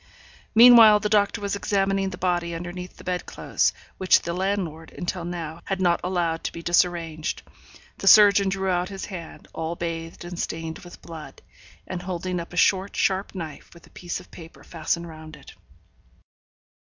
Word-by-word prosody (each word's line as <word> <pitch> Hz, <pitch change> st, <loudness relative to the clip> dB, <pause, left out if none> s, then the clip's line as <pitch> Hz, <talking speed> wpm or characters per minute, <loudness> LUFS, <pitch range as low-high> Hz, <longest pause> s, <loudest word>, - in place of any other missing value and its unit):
Meanwhile, 230 Hz, -2 st, +9 dB
the 210 Hz, -, -1 dB
doctor 205 Hz, -1 st, +2 dB
was 200 Hz, 0 st, -2 dB
examining 195 Hz, -1 st, 0 dB
the 180 Hz, -, -8 dB
body 175 Hz, -2 st, -1 dB
underneath 175 Hz, +2 st, -7 dB
the -, -, -13 dB
bed 180 Hz, -1 st, -3 dB
clothes, -, -, 0 dB, 0.3 s
which 185 Hz, -, +4 dB
the 170 Hz, -, -3 dB
landlord, 180 Hz, -4 st, -3 dB
until 175 Hz, 0 st, -3 dB
now, 170 Hz, -1 st, -6 dB
had 195 Hz, -1 st, -2 dB
not 175 Hz, -2 st, +2 dB
allowed 175 Hz, -3 st, -1 dB
to -, -, -1 dB
be 170 Hz, -, -9 dB
disarranged. 170 Hz, -2 st, 0 dB, 0.6 s
The -, -, -4 dB
surgeon 200 Hz, -2 st, +7 dB
drew 190 Hz, 0 st, -2 dB
out 180 Hz, 0 st, 0 dB
his 195 Hz, -1 st, -6 dB
hand, 175 Hz, -5 st, -9 dB
all 160 Hz, +1 st, -3 dB
bathed 165 Hz, 0 st, -5 dB
and 175 Hz, 0 st, -7 dB
stained 160 Hz, 0 st, -4 dB
with 175 Hz, -1 st, -13 dB
blood; 160 Hz, -2 st, -10 dB, 0.4 s
and 180 Hz, -1 st, -5 dB
holding 180 Hz, 0 st, -3 dB
up 170 Hz, -, -8 dB
a 175 Hz, -, -8 dB
short, 195 Hz, +2 st, +2 dB
sharp 195 Hz, +1 st, 0 dB
knife, 160 Hz, -5 st, -7 dB
with 170 Hz, -, -16 dB
a -, -, -22 dB
piece 175 Hz, -1 st, -5 dB
of -, -, -16 dB
paper 165 Hz, -1 st, -13 dB
fastened 170 Hz, +1 st, -3 dB
round 155 Hz, -1 st, -11 dB
it. -, -, -14 dB
175 Hz, 175 wpm, -24 LUFS, 170-190 Hz, 0.6 s, Meanwhile